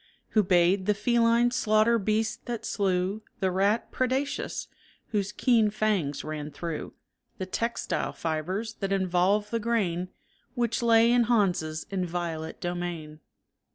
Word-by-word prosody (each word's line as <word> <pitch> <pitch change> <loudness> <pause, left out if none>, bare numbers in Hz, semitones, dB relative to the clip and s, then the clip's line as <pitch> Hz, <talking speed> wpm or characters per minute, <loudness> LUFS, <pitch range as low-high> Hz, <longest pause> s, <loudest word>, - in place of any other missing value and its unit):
Who 215 - +4
bayed 185 0 +3
the 210 - +3
feline 235 +2 +3
slaughter 220 -1 +3
beast 220 +4 -1
that 235 -2 -4
slew 190 0 0 0.2
The 190 -3 +1
rat 200 +5 +1
predacious, 260 +2 -1 0.4
whose 205 -2 -1
keen 230 -2 +3
fangs 205 -9 0
ran 155 -1 -5
through 165 +1 -6 0.4
The 185 - -3
textile 230 +5 -2
fibers 180 +8 -3
that 195 -1 -2
involved 195 +2 +1
the 230 - 0
grain 190 -6 0 0.5
Which 235 0 0
lay 230 0 +5
in 240 -1 +4
Hans's 180 -9 +1
inviolate 170 -4 -3
domain. 175 -3 -4
200 Hz, 125 wpm, -27 LUFS, 175-230 Hz, 0.5 s, lay